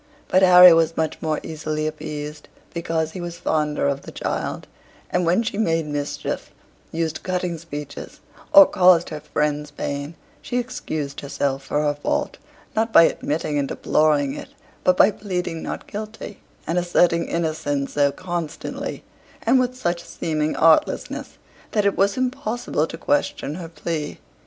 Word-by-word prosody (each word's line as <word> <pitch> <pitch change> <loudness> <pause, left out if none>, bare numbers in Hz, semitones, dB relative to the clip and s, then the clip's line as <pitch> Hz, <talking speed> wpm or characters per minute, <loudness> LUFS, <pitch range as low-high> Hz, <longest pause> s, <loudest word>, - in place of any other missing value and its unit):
But 185 - +4
Harry 180 -1 +9
was 165 0 +2
much 160 -1 -1
more 155 -2 -1
easily 155 -1 -3
appeased, 150 -1 -5 0.3
because 165 -1 -1
he 185 - -7
was 170 -1 -6
fonder 150 -4 0
of 140 0 -1
the - - -10
child: - - -3 0.5
and 180 -1 +1
when 180 +7 +3
she 215 -2 -3
made 165 -6 +1
mischief, 145 -1 -4 0.4
used 160 -1 -2
cutting 180 -2 -2
speeches, 150 -3 -8 0.3
or 295 -1 +10
caused 180 -5 +4
her 155 - -5
friends 150 0 -1
pain, 145 +1 -4 0.3
she 245 - -3
excused 155 - -4
herself 140 -1 -2
for 145 +2 -1
her 145 -1 +2
fault, 145 - -2 0.4
not 220 +1 +1
by 165 - +8
admitting 150 -2 0
and 140 - 0
deploring 145 -2 +2
it, - - -8 0.3
but 185 0 +4
by 210 - +6
pleading 180 -5 -4
not - - -5
guilty, 215 -1 -7 0.3
and 170 +3 +1
asserting 175 -1 +2
innocence 155 -4 -2
so 145 -1 +3
constantly, 175 -2 -5 0.4
and 250 +3 +4
with 255 0 -1
such 175 -7 -1
seeming 155 -1 -2
artlessness, 160 -1 +2 0.4
that 210 -2 +2
it 200 - +2
was 200 +3 +2
impossible 245 - -1
to - - -7
question 290 - 0
her 165 0 -7
plea. 155 -1 -4
165 Hz, 150 wpm, -22 LUFS, 150-185 Hz, 0.5 s, or